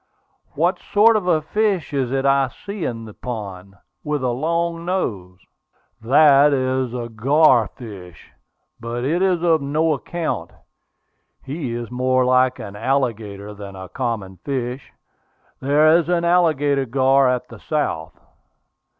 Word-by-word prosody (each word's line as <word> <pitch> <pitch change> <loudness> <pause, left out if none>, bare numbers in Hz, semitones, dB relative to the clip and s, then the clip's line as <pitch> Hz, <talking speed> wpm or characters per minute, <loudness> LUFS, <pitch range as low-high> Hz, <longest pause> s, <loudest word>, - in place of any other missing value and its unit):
"What - - +1
sort 220 +2 +4
of 205 -4 -1
a 155 -3 +2
fish 200 -2 -1
is 130 -3 -1
it 135 0 -1
I 135 -1 +3
see 200 +7 -7
in 115 -2 -4
this 110 - -12
pond, 100 -5 -7 0.3
with 150 -3 -2
a 125 - +1
long 170 +5 -1
nose?" 100 - -3 0.6
"That 140 +3 +5
is 130 -1 0
the 120 -1 -4
gar 125 +1 +3
fish; 100 -9 -12 0.5
but 120 +1 -4
it 165 +7 0
is 185 -3 +1
of 165 -3 +3
no 155 +3 +1
account. 135 - -4 0.9
He 135 -3 -4
is 120 0 -6
more 130 0 +1
like 130 0 +3
an 100 -1 -8
alligator 110 -4 -2
than 100 -1 -10
a 95 -1 -9
common 110 -7 -4
fish. 130 - -4 0.7
There 150 +4 +4
is 170 -1 +1
an 170 -1 +1
alligator 150 -6 +2
gar 135 +1 +3
at 125 -1 -1
the 115 - -12
South. 125 - -3
130 Hz, 140 wpm, -21 LUFS, 115-155 Hz, 0.9 s, That